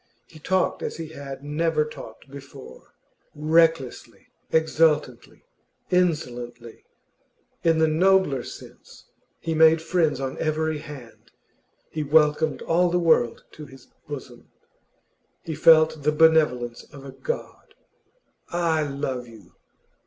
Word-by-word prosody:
He 160 - -16
talked 185 +4 0
as - - -5
he 165 -2 -7
had 140 -3 -9
never 155 +1 0
talked 115 -7 -11
before, 140 -1 -13 0.4
recklessly, 155 -3 0 0.2
exultantly, 155 -5 0 0.5
insolently 125 -10 -2 0.8
in 165 -1 +3
the 160 - +4
nobler 175 -4 +2
sense. - - -13 0.3
He 165 - -3
made 160 0 +5
friends 160 -4 0
on 135 -1 -5
every 155 0 -1
hand; 145 -7 -12 0.6
he 155 - -3
welcomed 150 +1 +2
all 175 +2 +2
the 175 - +1
world 160 -9 +2
to 150 -1 -11
his 135 -1 -17 0.2
bosom; 130 -4 -9 0.9
he 160 - -5
felt 155 0 +5
the 150 +2 +2
benevolence 150 -7 +2
of 140 -1 -12
a 135 - -8
god. 475 - -7 0.7
'I 170 -2 0
love 135 -3 -4
you! 110 -6 -16
155 Hz, 115 wpm, -24 LUFS, 135-160 Hz, 0.9 s, made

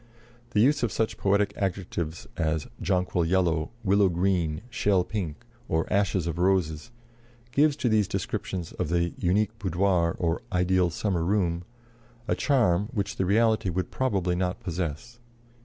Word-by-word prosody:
The 105 -3 +2
use 140 +5 +4
of 120 -4 0
such 110 +2 -1
poetic 100 +1 +2
adjectives 90 -4 -3
as 80 -2 -1 0.2
jonquil 90 -2 +1
yellow, 80 -2 +1
willow 100 -1 +4
green, 85 -3 0
shell 100 -7 +2
pink, 90 -6 -5 0.2
or 80 0 +1
ashes 95 -3 +1
of 85 0 -3
roses, 90 -1 +1 0.6
gives 145 +3 +3
to 135 - -1
these 110 -4 +3
descriptions 90 -4 -3
of - - -3
the 85 0 +1
"unique 105 +5 +1
boudoir" 90 -2 +1
or 85 -1 0
"ideal 90 0 +2
summer 85 0 -1
room" 90 -2 0 0.6
a - - +2
charm 105 - +2
which 105 -5 -3
the 95 - 0
reality 110 -1 +3
would 90 +1 -2
probably 95 -9 0
not 90 0 -1
possess. 90 +6 -4
95 Hz, 145 wpm, -27 LUFS, 85-105 Hz, 0.6 s, use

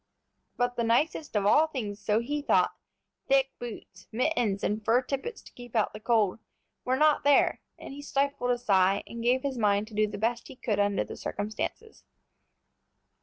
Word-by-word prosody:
But 245 0 0
the 235 - +1
nicest 285 +5 0
of 205 -1 +1
all 300 +10 +5
things, 215 -9 -5
so 210 +2 +2
he 290 +5 -3
thought, - - +2 0.5
thick 270 0 +3
boots, 215 -5 -9
mittens, 230 -5 0
and 215 +1 -1
fur 235 +4 +3
tippets 280 - -5
to - - -16
keep 245 -1 -12
out 220 - +1
the 210 - -8
cold, 215 -3 +1 0.4
were 255 - +1
not 305 +1 +3
there, 285 0 +4 0.2
and - - -9
he 285 - -8
stifled 280 -2 -1
a 245 - +2
sigh, 195 -4 +2
and 235 - -8
gave 250 +2 +2
his 270 -3 -2
mind 205 -1 +2
to - - -15
do 215 0 +2
the 205 -1 -6
best 230 +3 -1
he 270 - -11
could 220 -5 -2
under 205 0 +2
the - - -8
circumstances. 215 - -5
235 Hz, 185 wpm, -28 LUFS, 210-270 Hz, 0.5 s, all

